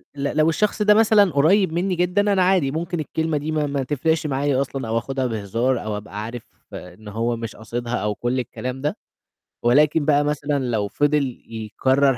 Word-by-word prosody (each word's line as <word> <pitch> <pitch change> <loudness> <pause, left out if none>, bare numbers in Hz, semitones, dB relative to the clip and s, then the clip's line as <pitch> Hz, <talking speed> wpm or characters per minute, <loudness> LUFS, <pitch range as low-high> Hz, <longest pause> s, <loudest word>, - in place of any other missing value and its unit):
لو 150 +3 +1
الشخص 210 +5 0
ده 210 0 +6
مثلًا 210 -3 +5
قريّب 165 +6 +3
منّي 180 +2 0
جدًا، 195 +4 +2
أنا 190 -2 +3
عادي 180 -7 +2
ممكن 170 +2 -3
الكلمة 160 +1 -1
دي 150 +2 -3
ما 150 -1 0
ما 140 -1 -1
تفرقش 150 +4 0
معايا 140 -1 +1
أصلًا 135 -2 -4
أو 115 +1 0
آخُدها 130 +3 -2
بهزار 115 +4 -1
أو 105 -1 -3
أبقى 105 0 -7
عارف 115 +1 -6 0.3
إن 90 +4 -10
هو 115 +3 -1
مش 115 -1 -6
قاصدها 120 +2 -4
أو 105 -2 -1
كل 120 +4 -1
الكلام 130 +1 -5
ده، 150 - -2 0.7
ولكن 145 +5 +4
بقى 145 -1 +3
مثلًا 145 -1 -1
لو 110 -4 -1
فضِل 145 +1 0
يكرَّر 130 +5 +1
140 Hz, 180 wpm, -22 LUFS, 120-160 Hz, 0.7 s, ده